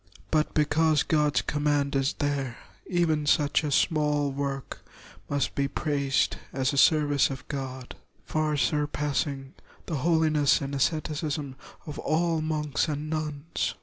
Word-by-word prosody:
But 155 -1 +1
because 155 0 +3
God's 150 -2 +2
com 145 0 -2
mand 145 -1 +1
is 135 +1 +1
there, 140 -4 -2 0.3
even 160 -5 +1
such 145 0 +3
a 150 - -1
small 150 -1 +2
work 135 -1 -4 0.5
must 140 -3 0
be 140 0 0
praised 140 -1 0
as 130 +1 0
a - - -2
service 145 -1 +4
of 135 0 -7
God, 130 -3 -5 0.3
far 155 -1 0
surpassing 145 -2 -1 0.3
the 160 - -3
holiness 155 -1 +3
and 140 0 -5
asceticism 150 -1 -1 0.3
of 150 -1 -7
all 165 0 +1
monks 155 -1 -1
and 155 0 -3
nuns. 155 0 -3
145 Hz, 135 wpm, -27 LUFS, 140-155 Hz, 0.5 s, service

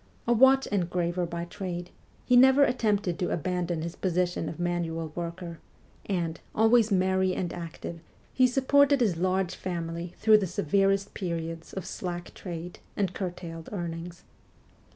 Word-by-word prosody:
A 240 - +5
watch 265 +3 +6
engraver 175 -2 -1
by 170 0 -4
trade, 175 -1 -5 0.3
he 250 - +4
never 265 +3 +7
attempted 210 -8 +1
to 180 - 0
abandon 175 -1 -1
his 170 +1 -5
position 180 -3 -1
of 165 - -8
manual 170 -2 -2
worker, 170 0 -6 0.5
and, 170 -4 -1 0.2
always 225 0 +4
merry 190 0 +2
and 175 - -2
active, 170 0 -7 0.3
he 255 -1 +5
supported 280 +2 +4
his 205 -9 +2
large 185 +1 0
family 170 -1 -5
through 215 -1 +6
the 195 - -1
severest 195 +4 +1
periods 165 -3 -4
of 190 - -5
slack 175 -1 -5
trade 175 -1 -7 0.2
and 195 -3 0
curtailed 170 -3 -6
earnings. 170 -2 -5
180 Hz, 140 wpm, -28 LUFS, 170-200 Hz, 0.5 s, never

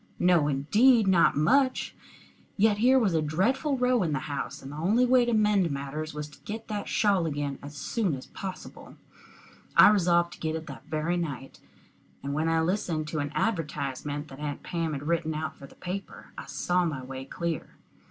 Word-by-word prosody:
No 175 -4 +3
indeed 210 - +4
not 180 -6 +4
much! 260 - +2 0.6
Yet 210 0 +3
here 255 +4 +5
was 215 -8 +2
a 160 - +2
dreadful 250 - 0
row 250 -1 +2
in 165 -4 0
the 135 - -1
house, 140 -2 -4
and 135 - -8
the - - -8
only 210 +10 +3
way 250 -1 +4
to 240 - 0
mend 210 -5 +3
matters 140 +2 -4
was 150 0 -5
to - - -17
get 220 +2 -7
that 205 -1 -3
shawl 195 -5 +2
again 145 -2 -3
as 145 +1 -9
soon 195 - -1
as 130 - -9
possible. 190 -1 -8 0.8
I - - +10
resolved 175 -4 +3
to - - -14
get 160 0 -2
it 160 0 -5
that - - -10
very 160 +3 -1
night, 140 -6 -5 0.6
and 140 0 -3
when 155 +2 0
I 165 0 +2
listened 160 -3 -1
to 155 - -2
an 145 0 -2
advertisement 150 - -2
that 135 - -11
Aunt 150 -1 -5
Pam 165 -3 -2
had 140 -1 -4
written 165 -2 0
out 155 +1 -4
for 140 - -12
the - - -18
paper, 185 +2 -7
I - - -8
saw 180 0 0
my 150 -6 -3
way 130 +1 -7
clear. 165 +4 -4
165 Hz, 195 wpm, -28 LUFS, 150-205 Hz, 0.8 s, I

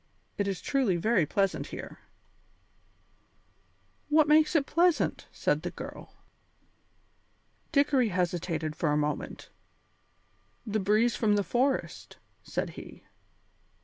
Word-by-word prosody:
It 200 - -1
is 190 -3 -3
truly 260 -10 +1
very 180 -3 +2
pleasant 195 +3 0
here." - - -8 2.1
"What 305 0 +4
makes 305 +2 +4
it 290 -3 +3
pleasant?" 345 +2 +1
said - - 0
the - - -3
girl. - - -10 1.6
Dickory 280 -5 +3
hesitated 170 -3 -2
for 160 -2 0
a 150 - +2
moment. 150 0 -3 1.1
"The 215 -1 -1
breeze 215 +3 +2
from 210 -2 +2
the 205 - +1
forest," 260 +6 -1 0.2
said - - -3
he. - - -11
210 Hz, 110 wpm, -29 LUFS, 180-275 Hz, 2.1 s, What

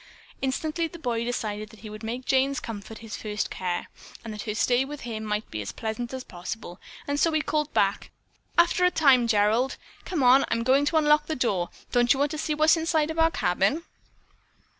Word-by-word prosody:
Instantly 310 +5 -1
the 340 - -11
boy 240 -7 -2
decided 215 -3 -3
that 220 -1 -16
he 215 - -8
would 215 0 -9
make 240 +3 -5
Jane's 270 +1 +2
comfort 220 -1 -7
his 220 - -6
first 210 -1 -3
care, 180 -1 -2 0.4
that 215 -2 -6
her 210 -1 -4
stay 245 +3 +2
with 290 +1 -7
him 220 -3 -5
might 210 0 -2
be 110 - -3
as 100 - -5
pleasant 230 +2 -4
as 260 -1 -5
possible, 180 0 -7 0.3
and 285 0 -1
so 330 - +3
he 310 - +3
called 300 -1 -1
back: - - +1 0.5
"After 345 +1 +4
a 360 - +6
time, 270 -8 +4
Gerald. 220 +4 +2 0.3
Come 330 -7 -1
on; 255 +2 +7
I'm 230 0 0
going 270 +4 +4
to 320 +2 +2
unlock 300 -1 +4
the 315 - -2
door. 200 -9 0 0.2
Don't 240 0 +4
you - - -4
want 290 +1 +1
to 310 - -4
see 305 0 -1
what's 310 +2 +5
on - - -2
the - - -2
inside 320 -2 +1
of 320 - -4
our 325 0 +5
cabin?" 195 - +1
250 Hz, 215 wpm, -26 LUFS, 215-300 Hz, 0.5 s, on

